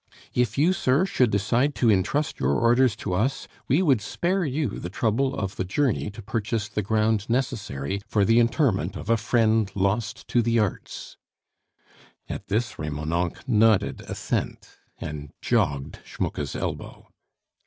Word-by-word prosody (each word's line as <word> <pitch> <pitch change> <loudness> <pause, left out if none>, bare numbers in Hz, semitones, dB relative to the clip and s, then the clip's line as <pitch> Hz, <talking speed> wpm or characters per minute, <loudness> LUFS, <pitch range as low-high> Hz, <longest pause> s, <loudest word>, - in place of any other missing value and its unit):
"If 120 -2 0
you, 165 +6 +4
sir, 140 0 +2
should 130 - +2
decide 115 +8 +1
to 115 -3 +3
intrust 105 - 0
your 65 +2 +2
orders 120 - +3
to 105 -3 -4
us, 130 +9 0 0.2
we 150 +9 +3
would 135 - +3
spare 180 - -1
you 145 -1 -1
the 85 - -5
trouble 115 +7 0
of 95 -2 -4
the - - 0
journey 110 +4 0
to 110 +1 -10
purchase 105 +1 -2
the 105 - -2
ground 110 +1 +1
necessary 100 - -2
for 105 -2 +2
the 115 +3 +5
interment 115 - +1
of 110 - -3
a - - +6
friend 110 -2 +2
lost 100 +3 -1
to 120 - +3
the 115 0 +1
arts 105 -3 -3 0.5
" - - -30
At - - -6
this 110 +3 -1
Remonencq 80 - -3
nodded 105 - +3
assent, - - -3 0.3
and 75 -1 -6
jogged 80 - 0
Schmucke's 70 -2 -4
elbow. - - -5
110 Hz, 155 wpm, -25 LUFS, 95-125 Hz, 0.5 s, a